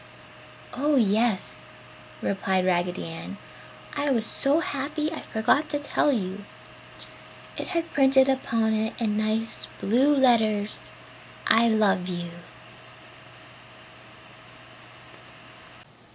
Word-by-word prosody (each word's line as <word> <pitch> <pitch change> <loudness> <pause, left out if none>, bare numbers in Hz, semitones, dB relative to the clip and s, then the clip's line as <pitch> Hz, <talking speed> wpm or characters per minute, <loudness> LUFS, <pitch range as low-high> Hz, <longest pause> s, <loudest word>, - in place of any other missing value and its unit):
"Oh 290 +3 +1
yes," 220 -3 0 0.5
replied 190 -1 0
Raggedy 180 0 0
Ann, 165 +4 -7 0.6
"I 285 0 0
was 230 -5 +1
so 280 +7 +1
happy 300 +1 -3
I - - -6
forgot 245 +8 +1
to 295 - -1
tell 290 0 +1
you. 200 -4 -3 1.1
It - - -5
had 335 -2 -2
printed 270 -1 +5
upon 230 -4 +1
it 220 0 -1
in 215 -3 0
nice 215 +1 -1
blue 265 +8 +3
letters, 220 -6 +1 0.5
'I 230 +1 +4
LOVE 205 -5 +2
YOU.'" 175 -1 -5
225 Hz, 95 wpm, -25 LUFS, 205-275 Hz, 1.1 s, printed